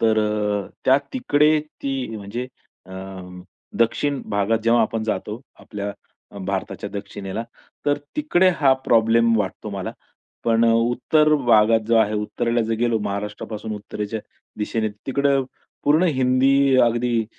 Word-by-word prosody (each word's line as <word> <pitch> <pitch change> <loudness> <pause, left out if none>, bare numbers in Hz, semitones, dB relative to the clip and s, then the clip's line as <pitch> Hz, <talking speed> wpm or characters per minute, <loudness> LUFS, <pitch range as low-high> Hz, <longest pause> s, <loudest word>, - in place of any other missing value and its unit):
तर 110 -1 +3
अ, 105 -1 0 0.2
त्या 130 +1 +6 0.2
तिकडे 155 - +3
ती 135 -6 -5
म्हणजे 110 +5 -5 0.4
अ, - - -11 0.9
दक्षिण 140 +4 +1
भागात 105 +2 +1
जेव्हा 120 +1 +4
आपण 115 -1 -1
जातो, 110 0 -3 0.2
आपल्या 100 -1 -5 0.5
भारताच्या 100 +1 -3
दक्षिणेला, 100 +1 -5 0.4
तर 145 0 +2 0.2
तिकडे 190 -12 +3
हा 135 -3 +6
प्रॉब्लेम 115 0 +4
वाटतो 105 +1 -3
मला. 95 -2 -4 0.5
पण 115 0 +3
अ, 115 - +4 0.2
उत्तर 155 +5 +3
भागात 115 -5 +4
जो 115 0 +3
आहे, 110 -1 +3
उत्तरेला 115 +3 -1
जर 115 0 -1
गेलो 120 -2 +2
महाराष्ट्रापासून 105 +1 -5
उत्तरेच्या 105 +1 -5 0.4
दिशेने, 110 +1 -1 0.2
तिकडे 140 +1 +2 0.5
पूर्ण 155 +5 +4
हिंदी, 135 +1 +4
अगदी 120 -1 +1
115 Hz, 130 wpm, -22 LUFS, 105-130 Hz, 0.9 s, त्या